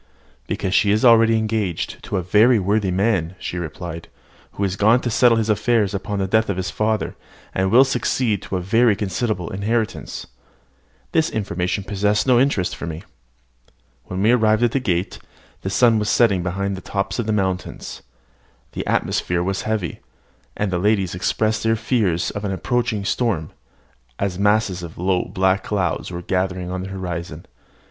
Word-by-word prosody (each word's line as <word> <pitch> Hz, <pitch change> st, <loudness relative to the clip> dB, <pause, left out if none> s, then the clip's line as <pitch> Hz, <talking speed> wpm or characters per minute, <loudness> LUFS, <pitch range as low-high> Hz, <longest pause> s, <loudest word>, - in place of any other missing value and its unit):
"Because 95 Hz, -, -2 dB
she 100 Hz, -, +3 dB
is 105 Hz, +4 st, +3 dB
already 115 Hz, -1 st, +6 dB
engaged 110 Hz, -5 st, -2 dB
to 100 Hz, -, -2 dB
a 90 Hz, -, -1 dB
very 110 Hz, +7 st, +5 dB
worthy 100 Hz, 0 st, +1 dB
man," 95 Hz, -2 st, 0 dB
she 90 Hz, -, -5 dB
replied, 85 Hz, 0 st, -6 dB, 0.5 s
"who 100 Hz, -, -3 dB
is 95 Hz, -1 st, 0 dB
gone 110 Hz, +4 st, +4 dB
to 120 Hz, -, -2 dB
settle 120 Hz, 0 st, +4 dB
his 110 Hz, -1 st, 0 dB
affairs 105 Hz, -1 st, +1 dB
upon 100 Hz, +1 st, -3 dB
the 95 Hz, -, 0 dB
death 110 Hz, +2 st, +2 dB
of 100 Hz, -, -1 dB
his 95 Hz, 0 st, -2 dB
father, 110 Hz, 0 st, -1 dB, 0.4 s
and 95 Hz, 0 st, +1 dB
will 125 Hz, +6 st, +7 dB
succeed 125 Hz, -5 st, 0 dB
to -, -, -5 dB
a 90 Hz, -, -1 dB
very 115 Hz, +4 st, +3 dB
considerable 100 Hz, -2 st, -2 dB
inheritance." 110 Hz, +3 st, -2 dB, 0.9 s
This 160 Hz, 0 st, +2 dB
information 95 Hz, -2 st, -2 dB
possessed 105 Hz, +1 st, 0 dB
no 125 Hz, -2 st, +4 dB
interest 125 Hz, -9 st, +1 dB
for 85 Hz, -, -6 dB
me. 80 Hz, 0 st, -6 dB, 1.0 s
When 95 Hz, +2 st, -3 dB
we 110 Hz, -, +5 dB
arrived 110 Hz, -2 st, +3 dB
at 120 Hz, -, +3 dB
the 135 Hz, -, +1 dB
gate, 90 Hz, -6 st, -1 dB, 0.4 s
the 95 Hz, -, -3 dB
sun 115 Hz, +2 st, +4 dB
was 105 Hz, 0 st, -1 dB
setting 105 Hz, -7 st, +3 dB
behind 95 Hz, +2 st, -2 dB
the 95 Hz, -, -8 dB
tops 100 Hz, +1 st, -3 dB
of 115 Hz, -, -1 dB
the -, -, +1 dB
mountains. 95 Hz, -3 st, -3 dB, 0.7 s
The -, -, -5 dB
atmosphere 85 Hz, 0 st, 0 dB
was 95 Hz, +1 st, -1 dB
heavy; 105 Hz, -6 st, -2 dB, 0.6 s
and 105 Hz, -2 st, -1 dB
the 90 Hz, -, 0 dB
ladies 100 Hz, -2 st, +1 dB
expressed 110 Hz, +4 st, 0 dB
their 115 Hz, 0 st, +2 dB
fears 110 Hz, -7 st, 0 dB
of 105 Hz, -, -6 dB
an 100 Hz, -, -2 dB
approaching 110 Hz, 0 st, -1 dB
storm, 105 Hz, -7 st, -1 dB, 0.7 s
as 95 Hz, -2 st, -2 dB
masses 105 Hz, -3 st, +2 dB
of 85 Hz, -2 st, -9 dB
low 90 Hz, 0 st, 0 dB
black 95 Hz, +2 st, +1 dB
clouds 95 Hz, -6 st, -1 dB
were 90 Hz, -1 st, -6 dB
gathering 90 Hz, 0 st, -2 dB
in 95 Hz, 0 st, -3 dB
the 95 Hz, -, -6 dB
horizon. 85 Hz, -4 st, -5 dB
100 Hz, 175 wpm, -21 LUFS, 90-110 Hz, 1.0 s, will